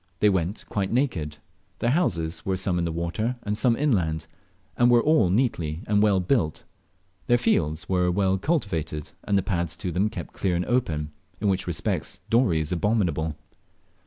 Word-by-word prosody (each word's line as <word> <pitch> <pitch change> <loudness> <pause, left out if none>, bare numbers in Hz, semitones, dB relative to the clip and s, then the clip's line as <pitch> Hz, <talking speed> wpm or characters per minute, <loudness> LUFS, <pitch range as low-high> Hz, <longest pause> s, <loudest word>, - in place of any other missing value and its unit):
They 105 - +5
went 95 +1 -1
quite 100 -2 -2
naked. 90 - -1 0.4
Their 120 - +1
houses 85 - 0
were 95 -1 -1
some 90 -1 0
in 85 - 0
the 85 - -1
water 85 +9 -2
and 105 0 -1
some 115 +2 +2
inland, 85 - +1 0.5
and 120 0 +4
were 120 -1 +5
all 150 - +4
neatly 90 - 0
and 105 0 +2
well 105 -3 +4
built; 90 - 0 0.6
their 120 - +5
fields 80 -7 0
were 90 -1 +2
well 95 +1 +1
cultivated, 85 - -2
and 100 - +2
the 95 - +1
paths 85 -4 -1
to 90 - -4
them 95 +5 +1
kept 115 - -7
clear 90 -3 0
and 90 +1 -1
open, 80 -12 0 0.3
in 105 - +1
which 95 -1 0
respects 85 +2 -2
Dorey 115 -9 +3
is 75 - -4
abominable. 85 -5 0
95 Hz, 175 wpm, -25 LUFS, 85-110 Hz, 0.6 s, They